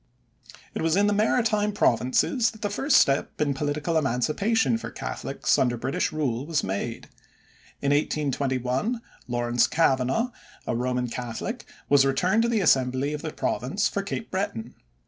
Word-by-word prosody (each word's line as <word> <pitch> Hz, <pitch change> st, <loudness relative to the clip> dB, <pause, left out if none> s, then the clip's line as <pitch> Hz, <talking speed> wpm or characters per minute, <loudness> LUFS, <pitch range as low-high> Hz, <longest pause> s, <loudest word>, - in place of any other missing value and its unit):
It -, -, -3 dB
was 165 Hz, +1 st, +2 dB
in 200 Hz, +1 st, +4 dB
the 205 Hz, -, +2 dB
Maritime 215 Hz, 0 st, +2 dB
Provinces 165 Hz, -, +2 dB
that 220 Hz, -1 st, -12 dB
the 205 Hz, -, -1 dB
first 275 Hz, +8 st, +3 dB
step 140 Hz, +1 st, +2 dB
in 145 Hz, -2 st, +1 dB
political 150 Hz, +3 st, -1 dB
emancipation 140 Hz, -, +1 dB
for -, -, -6 dB
Catholics -, -, -2 dB
under 120 Hz, -2 st, +1 dB
British 130 Hz, +4 st, -1 dB
rule 135 Hz, -6 st, -1 dB
was 160 Hz, -2 st, 0 dB
made. 100 Hz, +5 st, -4 dB, 0.8 s
In 140 Hz, -, +2 dB
1821 140 Hz, -, 0 dB, 0.3 s
Lawrence 120 Hz, 0 st, +1 dB
Cavanaugh, 160 Hz, -, +1 dB, 0.3 s
a -, -, -1 dB
Roman 125 Hz, +1 st, -1 dB
Catholic, 125 Hz, -, -5 dB, 0.2 s
was 140 Hz, -1 st, +5 dB
returned 180 Hz, +11 st, +2 dB
to 235 Hz, -, +1 dB
the 225 Hz, -3 st, +1 dB
Assembly 130 Hz, -2 st, +2 dB
of 150 Hz, -, -4 dB
the 155 Hz, -, -4 dB
Province 170 Hz, +14 st, -1 dB
for 200 Hz, -, -2 dB
Cape 200 Hz, +3 st, -5 dB
Breton. 125 Hz, -, -3 dB
145 Hz, 150 wpm, -25 LUFS, 125-205 Hz, 0.8 s, was